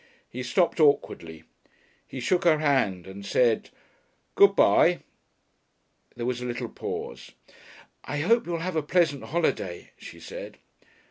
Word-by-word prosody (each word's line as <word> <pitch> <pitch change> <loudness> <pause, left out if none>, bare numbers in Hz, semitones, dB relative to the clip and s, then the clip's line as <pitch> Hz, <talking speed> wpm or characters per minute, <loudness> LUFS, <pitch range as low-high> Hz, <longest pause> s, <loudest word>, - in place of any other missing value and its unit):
He 125 - -6
stopped 170 +8 +1
awkwardly. 85 - +1 0.6
He 130 - -7
shook 175 +9 +1
her 165 -3 +4
hand 130 - +1
and 95 +1 -10
said, 115 +2 +1 0.6
"Good 200 0 +5
bye." 175 -2 +4 1.1
There 120 - -5
was 125 0 -2
a - - -4
little 120 -1 -4
pause. - - -7 0.7
"I 145 - -4
hope 230 +7 +2
you 175 - -3
will 165 - -2
have 180 0 -3
a 155 - +1
pleasant 150 -2 +1
holiday," 125 - -2
she - - -11
said. - - -9
145 Hz, 140 wpm, -26 LUFS, 120-170 Hz, 1.1 s, Good